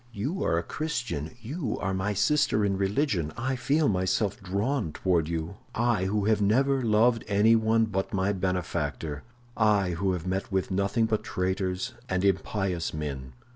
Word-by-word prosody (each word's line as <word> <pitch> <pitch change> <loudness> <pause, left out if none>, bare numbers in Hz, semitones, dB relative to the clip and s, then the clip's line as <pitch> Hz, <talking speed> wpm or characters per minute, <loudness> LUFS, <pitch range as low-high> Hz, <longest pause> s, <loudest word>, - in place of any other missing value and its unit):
You 135 - -3
are 85 - +2
a 85 - 0
Christian; 120 - -3
you 130 -1 -3
are 95 -1 -1
my 95 +2 -1
sister 125 -3 +2
in 100 -1 +1
religion. 95 - 0
I 130 +2 -1
feel 145 +4 +2
myself 95 +3 0
drawn 100 - -1
toward 85 -5 +1
you—I, 95 +6 -1
who 100 +1 0
have 110 -1 +2
never 135 +6 +3
loved 115 +1 +3
anyone 110 +2 +4
but 95 -3 -2
my 95 +1 +1
benefactor—I 95 - -1
who 95 +3 0
have 90 -1 -4
met 95 +2 -2
with 95 0 -1
nothing 100 +4 +1
but 110 -1 -1
traitors 95 0 -2 0.2
and 95 +1 0
impious 95 -3 0
men. 70 -4 -5
100 Hz, 150 wpm, -27 LUFS, 90-115 Hz, 0.2 s, anyone